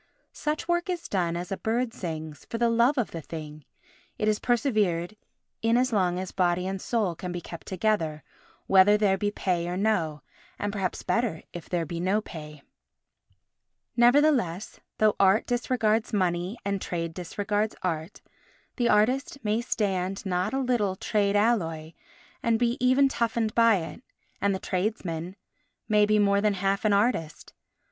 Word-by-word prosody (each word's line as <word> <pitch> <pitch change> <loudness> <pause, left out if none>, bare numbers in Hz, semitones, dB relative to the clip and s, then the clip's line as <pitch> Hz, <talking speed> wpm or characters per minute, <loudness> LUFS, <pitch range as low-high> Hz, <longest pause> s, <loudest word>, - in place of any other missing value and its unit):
Such 300 +1 -3
work 345 +1 0
is 350 -2 -3
done 170 -3 0
as 175 +2 -6
a 195 - -1
bird 230 +1 -1
sings—for 160 +3 -6
the 235 0 +2
love 235 +5 +3
of 245 - 0
the 165 - -5
thing; 155 -2 -8 0.5
it 215 - -1
is 215 -1 +2
persevered 215 -8 +1 0.5
in 225 +1 +3
as 250 0 +1
long 180 -4 +2
as 185 0 -4
body 180 -1 +1
and 190 0 -3
soul 215 -7 0
can 180 +2 -6
be 175 - -3
kept 170 -1 -10
together, 180 -6 -1 0.4
whether 195 +2 +6
there 205 -2 +3
be 205 +1 -1
pay 180 -4 -1
or 180 +1 -3
no, 165 -9 0 0.3
and 205 0 -3
perhaps 190 -3 -2
better 230 -9 -1
if 175 - -8
there 175 -2 0
be 170 +2 -5
no 190 +4 +1
pay. 150 -7 -10 1.3
Nevertheless, 240 - +3 0.2
though 215 -1 +3
art 195 +2 +4
disregards 235 -3 0
money 185 0 0
and 200 -1 -1
trade 165 -2 -3
disregards 205 +4 -2
art, 165 0 -3 0.6
the 240 -2 +2
artist 250 +7 +2
may 215 +2 +1
stand 195 -5 -1
not 180 -1 0
a 265 - -1
little 240 -7 +1
trade 200 0 0
alloy 165 -8 +1 0.5
and 230 -1 +2
be 240 0 +1
even 260 +2 +5
toughened 230 -4 -1
by 230 -2 +5
it, 170 +5 -5 0.4
and 200 0 +2
the - - -4
tradesmen 185 -3 -3 0.5
may 210 -1 +4
be 215 0 +3
more 200 -1 +3
than 210 -1 +2
half 195 +2 0
an 215 - +4
artist. 200 -7 0
200 Hz, 160 wpm, -27 LUFS, 175-230 Hz, 1.3 s, whether